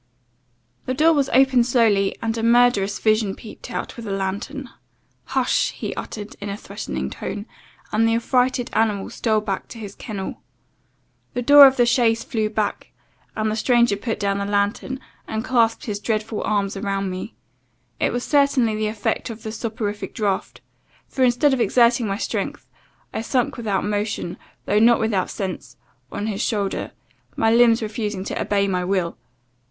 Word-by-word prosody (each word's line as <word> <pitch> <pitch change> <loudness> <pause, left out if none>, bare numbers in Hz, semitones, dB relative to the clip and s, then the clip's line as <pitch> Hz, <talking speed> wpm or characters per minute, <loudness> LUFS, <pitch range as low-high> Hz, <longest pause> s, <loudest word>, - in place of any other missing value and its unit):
"The 255 - -1
door 320 +4 +5
was 280 -3 +1
opened 260 -2 +4
slowly, 220 -6 +3
and 225 0 -1
a 225 - -2
murderous 230 -4 +3
visage 215 -2 +1
peeped 220 +2 -11
out, 245 - -5
with 230 -2 -7
a - - -3
lantern. 205 +8 -4 0.5
'Hush!' - - +1
he - - -5
uttered, 210 -1 -7
in 200 - -4
a 200 - -4
threatning 200 - -5
tone, 205 0 -5 0.5
and 225 +1 +3
the 225 - +2
affrighted 250 +1 +1
animal 215 -3 0
stole 220 -2 +1
back 200 -3 -3
to - - -10
his 205 -3 -7
kennel. 200 -4 -6 0.9
The 245 - -1
door 285 +2 +10
of 265 +1 +1
the 240 - +5
chaise 235 -2 +2
flew 215 -2 -1
back, 215 -1 -2 0.4
the 215 0 0
stranger 235 0 +3
put 225 +2 -3
down 200 -1 0
the 200 - -2
lantern, 205 +6 -1 0.3
and 220 +2 -3
clasped 230 -3 +2
his 205 -3 -3
dreadful 215 0 -2
arms 200 -2 0
around 195 -1 -2
me. 185 +5 -6 0.6
It - - +1
was 245 0 -2
certainly 280 -6 +3
the 215 0 -1
effect 210 +3 -2
of 225 -1 -8
the 220 - -4
soporific 215 -2 -4
draught, 205 -5 -2 0.5
for, 265 - -5
instead 255 +3 +4
of 260 - 0
exerting 235 -1 +3
my 195 0 -1
strength, - - -3 0.5
I - - -2
sunk 245 +2 0
without 210 -5 -1
motion, 205 -4 -2 0.3
though 210 - +2
not 235 +2 +5
without 215 -4 0
sense, 180 -10 -5 0.3
on 205 - -3
his 210 -1 -2
shoulder, 205 -6 -1 0.5
my 225 0 +2
limbs 235 -1 +5
refusing 210 -3 -3
to - - -3
obey 200 -1 +1
my 180 -2 0
will. 180 -2 -1
220 Hz, 170 wpm, -22 LUFS, 200-240 Hz, 0.9 s, door